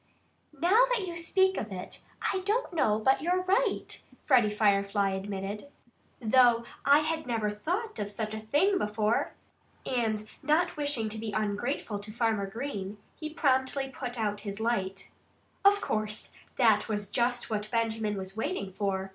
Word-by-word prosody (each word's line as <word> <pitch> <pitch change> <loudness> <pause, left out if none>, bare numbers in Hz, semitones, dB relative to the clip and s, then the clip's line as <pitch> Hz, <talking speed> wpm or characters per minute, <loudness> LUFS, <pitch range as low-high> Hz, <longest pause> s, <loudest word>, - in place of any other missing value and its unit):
"Now 400 - +5
that 475 -6 +1
you 345 -2 -5
speak 380 +3 +2
of 215 - -4
it, 185 -1 -6 0.3
I 380 - 0
don't 415 +3 -1
know 215 -10 +2
but 265 +5 +3
that - - -10
you're 360 +3 +1
right," 400 +4 0 0.2
Freddie 250 -7 +4
Firefly 200 -1 +2
admitted, 195 +4 -4 0.5
"though 240 0 +5 0.2
I 305 +3 +4
never 220 -3 0
thought 365 - -3
of 205 0 -3
such 215 +1 -4
a 220 - -3
thing 310 - +2
before." 210 +1 0 0.5
And 220 -4 -1
not 335 +4 +2
wishing 285 -7 0
to 220 +1 -5
be 215 -1 -4
ungrateful 210 +1 -2
to 205 +1 -6
Farmer 220 -3 0
Green, 210 -3 -5 0.2
he 310 - -6
promptly 270 -2 +1
put 250 -2 -6
out 210 -2 -1
his 205 0 -6
light. 195 -4 -2 0.5
Of 405 +1 +6
course, 215 0 -2 0.3
that 220 -4 +4
was 205 -2 -2
just 240 +2 0
what 210 0 -2
Benjamin 225 -2 0
was 190 0 -6
waiting 220 - -3
for. 195 -1 -2
225 Hz, 155 wpm, -29 LUFS, 210-295 Hz, 0.5 s, Of